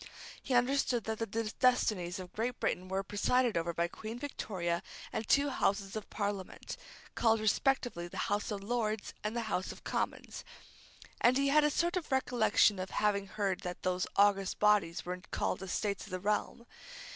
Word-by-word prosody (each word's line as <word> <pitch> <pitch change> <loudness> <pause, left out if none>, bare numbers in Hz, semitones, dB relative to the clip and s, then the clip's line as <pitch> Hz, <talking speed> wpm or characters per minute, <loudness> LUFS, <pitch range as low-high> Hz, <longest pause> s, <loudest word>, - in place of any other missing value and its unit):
He 260 - -1
understood 245 -1 +2
that 220 -1 -3
the 225 - -1 0.3
destinies 210 -8 +2
of 185 -1 -8
Great 240 +3 -2
Britain 185 +1 -1
were 190 +1 -1
presided 235 +4 +1
over 170 0 0
by 170 0 0
Queen 220 +5 -7
Victoria 185 -11 -2 0.3
and 220 - -3
two 285 +1 +4
Houses 200 -4 0
of 215 - -5
Parliament, 200 -3 -4 0.4
called 225 -1 +3
respectively 215 -4 +1
the - - -9
House 205 0 -1
of 200 -2 -4
Lords 215 -1 -1
and 210 +2 -2
the 235 - 0
House 200 -4 -2
of - - -12
Commons; - - -3 0.8
and 245 +2 +6
he 275 0 +2
had 300 +2 +5
a 295 - +4
sort 345 +4 +1
of 330 -5 -5
recollection 245 -6 +3
of 185 0 -3
having 200 -1 +1
heard 195 -1 -1
that 180 0 -6
those 185 0 0
august 200 -1 +3
bodies 210 -5 +3
were 180 0 -4
called 185 - -1
Estates 200 +1 -2
of - - -12
the 185 - -3
Realm. 210 +4 -1
210 Hz, 175 wpm, -33 LUFS, 190-240 Hz, 0.8 s, and